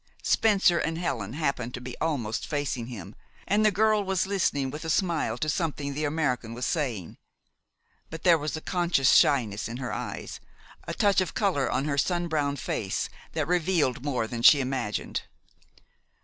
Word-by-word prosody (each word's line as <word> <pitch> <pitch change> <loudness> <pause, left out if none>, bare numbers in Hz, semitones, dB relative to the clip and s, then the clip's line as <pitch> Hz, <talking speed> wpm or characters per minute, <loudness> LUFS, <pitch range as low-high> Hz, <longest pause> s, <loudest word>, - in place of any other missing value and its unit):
Spencer 195 -5 +3
and 160 0 -1
Helen 120 - -3
happened 140 -5 -2
to - - -6
be 125 0 -7
almost 135 -9 -1
facing 145 -6 -2
him, 105 -5 -8 0.3
and 210 +2 +3
the 215 - +6
girl 215 +1 +2
was 190 -1 0
listening 170 -9 0
with 150 +3 -7
a 160 - -4
smile 165 - 0
to 155 - -2
something 150 -4 -2
the 150 +2 -2
American 130 -7 -1
was 125 +1 -3
saying. 125 - -2 0.9
But 160 0 -8
there 170 -3 +5
was 150 +2 -3
a - - -7
conscious 175 -8 +2
shyness 110 -8 +3
in 120 - -5
her 125 -1 -4
eyes, - - -5 0.5
a - - -3
touch 200 -2 +3
of 185 - -3
color 185 -11 +1
on 135 +2 0
her 140 -2 0
sun 175 +2 0
browned 145 -4 -1
face, 100 -6 -2 0.2
that - - -1
revealed 170 -7 +1
more 130 -6 -1
than 115 +1 -5
she 145 +4 +8
imagined. 125 -5 -2
145 Hz, 175 wpm, -27 LUFS, 125-175 Hz, 0.9 s, she